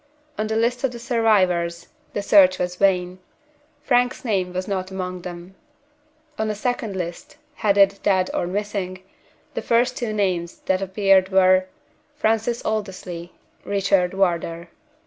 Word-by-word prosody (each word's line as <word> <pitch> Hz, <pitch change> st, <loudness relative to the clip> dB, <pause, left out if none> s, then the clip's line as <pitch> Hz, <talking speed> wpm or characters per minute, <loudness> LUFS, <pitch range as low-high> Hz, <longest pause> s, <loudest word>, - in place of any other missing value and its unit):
On 215 Hz, -, -2 dB
the 220 Hz, -, -2 dB
list 240 Hz, +3 st, 0 dB
of 270 Hz, -, +2 dB
the 240 Hz, -, -8 dB
survivors, 190 Hz, -8 st, +1 dB, 0.2 s
the 205 Hz, -, -2 dB
search 185 Hz, -3 st, +6 dB
was 180 Hz, 0 st, -2 dB
vain. 180 Hz, -1 st, +1 dB, 0.6 s
Frank's 245 Hz, -2 st, +1 dB
name 190 Hz, -5 st, 0 dB
was 185 Hz, +1 st, -4 dB
not 190 Hz, -2 st, -2 dB
among 185 Hz, -1 st, -5 dB
them. 175 Hz, +1 st, -9 dB, 0.9 s
On 220 Hz, 0 st, 0 dB
a 210 Hz, -, -2 dB
second 225 Hz, -2 st, -2 dB
list, 175 Hz, -2 st, -6 dB, 0.2 s
headed 200 Hz, -1 st, +3 dB
"Dead 185 Hz, -2 st, +2 dB
or 175 Hz, -, -1 dB
Missing," 190 Hz, -1 st, -3 dB, 0.5 s
the -, -, -3 dB
first 245 Hz, +2 st, +2 dB
two 240 Hz, -3 st, -3 dB
names 185 Hz, -5 st, -1 dB
that 190 Hz, 0 st, 0 dB
appeared 195 Hz, -1 st, +3 dB
were: 185 Hz, -1 st, +4 dB, 0.5 s
FRANCIS 225 Hz, -2 st, 0 dB
ALDERSLEY. 185 Hz, -5 st, -4 dB, 0.3 s
RICHARD 195 Hz, -2 st, +1 dB
WARDOUR. 170 Hz, -2 st, -1 dB
190 Hz, 140 wpm, -22 LUFS, 180-215 Hz, 0.9 s, search